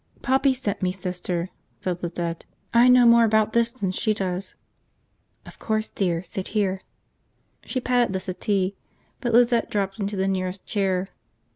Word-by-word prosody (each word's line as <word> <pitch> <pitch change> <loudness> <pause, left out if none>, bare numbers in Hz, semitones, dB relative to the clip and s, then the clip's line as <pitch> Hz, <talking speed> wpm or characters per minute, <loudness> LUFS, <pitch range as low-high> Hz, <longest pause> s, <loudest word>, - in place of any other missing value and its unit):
"Poppy 265 0 +3
sent 215 -6 -3
me, 185 -1 +1
Sister," 180 -1 -4 0.3
said 180 -1 -3
Lizette. 170 -1 -3 0.3
"I 235 +1 +6
know 250 -1 +7
more 235 0 +7
about 220 -1 +2
this 235 0 +3
than 205 -7 -3
she 215 +3 0
does." 185 -1 -3 0.9
"Of - - -13
course, 220 0 -1
dear. 175 -3 -1
Sit 185 +1 -5
here." 190 -2 0 0.8
She 255 - -2
patted 245 -3 +1
the 190 - -1
settee; 190 +1 -1 0.4
but 240 -3 -1
Lizette 235 0 +4
dropped 195 0 -2
into 200 0 -2
the 190 0 0
nearest 185 0 -2
chair. 190 -3 -1
195 Hz, 155 wpm, -24 LUFS, 185-235 Hz, 0.9 s, know